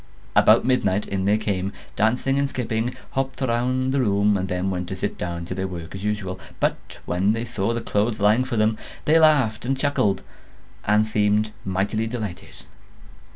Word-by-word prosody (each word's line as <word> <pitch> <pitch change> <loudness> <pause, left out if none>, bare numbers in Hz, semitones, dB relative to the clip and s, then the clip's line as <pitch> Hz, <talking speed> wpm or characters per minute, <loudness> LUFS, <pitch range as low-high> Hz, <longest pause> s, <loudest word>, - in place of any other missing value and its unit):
About - - +6
midnight 105 -6 +1
in 95 -1 -2
they 105 +2 +3
came, 100 -2 -2 0.2
dancing 125 +6 +1
and 140 0 +1
skipping, 120 -1 -2 0.2
hopped 135 0 -2
round 130 +1 0
the 140 - +2
room, 100 -2 +3
and 95 -1 -1
then 90 +1 -1
went 90 -1 -3
to 95 - -4
sit 100 +2 -3
down 85 -1 -4
to 90 - -5
their 95 +1 -2
work 85 -2 -7
as 95 0 -7
usual; 105 -3 -2 0.2
but - - -2
when 95 +4 +1
they 115 +1 -2
saw 110 -2 -1
the 115 0 -2
clothes 110 0 0
lying 105 +5 +4
for 120 - -3
them, 110 0 +2 0.3
they 160 +2 +5
laughed 145 -9 +4
and 135 +2 0
chuckled, 130 -9 +1 0.6
and 105 +1 +4
seemed 105 0 +1
mightily 100 +4 -1
delighted. 110 -6 -6
105 Hz, 180 wpm, -23 LUFS, 95-120 Hz, 0.6 s, About